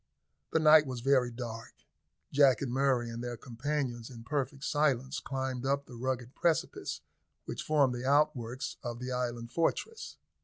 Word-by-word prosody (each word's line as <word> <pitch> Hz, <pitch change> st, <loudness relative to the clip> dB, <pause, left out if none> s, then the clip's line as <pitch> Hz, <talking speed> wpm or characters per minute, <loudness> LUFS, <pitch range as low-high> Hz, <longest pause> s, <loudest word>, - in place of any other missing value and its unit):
The -, -, +3 dB
night 155 Hz, -1 st, +7 dB
was 125 Hz, -2 st, -4 dB
very 130 Hz, -1 st, +3 dB
dark: 115 Hz, -2 st, -7 dB, 0.6 s
Jack 140 Hz, -2 st, +5 dB
and 130 Hz, -, -2 dB
Murray 130 Hz, -3 st, +2 dB
and 115 Hz, +1 st, -5 dB
their 120 Hz, -1 st, -4 dB
companions, 125 Hz, -1 st, -3 dB
in 115 Hz, -3 st, -10 dB
perfect 140 Hz, +2 st, -2 dB
silence, 140 Hz, -2 st, +1 dB
climbed 130 Hz, -2 st, -3 dB
up 140 Hz, +1 st, 0 dB
the 125 Hz, -, -13 dB
rugged 125 Hz, +1 st, -3 dB
precipice 170 Hz, -2 st, 0 dB, 0.4 s
which -, -, -4 dB
formed 145 Hz, -4 st, +3 dB
the 120 Hz, 0 st, -4 dB
outworks 135 Hz, -4 st, +1 dB
of 120 Hz, -3 st, -4 dB
the 125 Hz, +1 st, -5 dB
island 120 Hz, -2 st, -3 dB
fortress. 445 Hz, -, -1 dB
130 Hz, 155 wpm, -31 LUFS, 120-140 Hz, 0.6 s, night